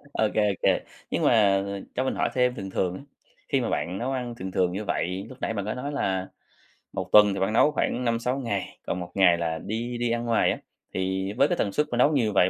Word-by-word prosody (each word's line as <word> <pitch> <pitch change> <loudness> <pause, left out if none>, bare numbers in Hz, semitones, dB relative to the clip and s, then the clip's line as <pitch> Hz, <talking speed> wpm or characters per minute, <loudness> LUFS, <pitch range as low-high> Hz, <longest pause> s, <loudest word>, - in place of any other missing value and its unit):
Ô 110 - +2
kê, 105 -1 +3
ô 100 - 0
kê. - - +3 0.3
Nhưng - - -1
mà, - - +5
à, 100 -2 +3 0.2
cho 130 - 0
mình - - -1
hỏi - - +1
thêm 125 -1 +2
thường 95 -1 -6
thường 90 -1 0
á, - - -9 0.5
khi 135 - +2
mà 120 - -1
bạn 85 +6 -2
nấu 130 +3 -2
ăn 125 -2 -3
thường 95 -4 -6
thường 90 -1 +1
như 105 +3 -4
vậy 95 +1 -2
lúc 130 - -12
nãy - - -1
bạn 100 -3 -3
có 110 - -2
nói 140 +3 -4
là, 95 -7 -1 0.7
1 - - -4
tuần 105 -1 +7
thì 95 - -3
bạn 95 +3 0
nấu 150 +6 +5
khoảng 125 -3 -1
5-6 120 +3 0
ngày, 115 -7 -3
còn 90 - -1
1 90 - -7
ngày 90 -3 +5
là 80 -1 -2
đi 120 +3 -4
đi 120 -1 0
ăn 120 0 -1
ngoài 115 -1 +3
á, - - -2 0.4
thì 95 +1 -1
với 135 +6 +4
cái 175 - -1
tần 100 - 0
suất 150 +8 +1
mà 120 - -1
nấu 145 +5 +5
nhiều 115 -7 +1
vậy 95 -1 +4
105 Hz, 265 wpm, -26 LUFS, 95-125 Hz, 0.7 s, tuần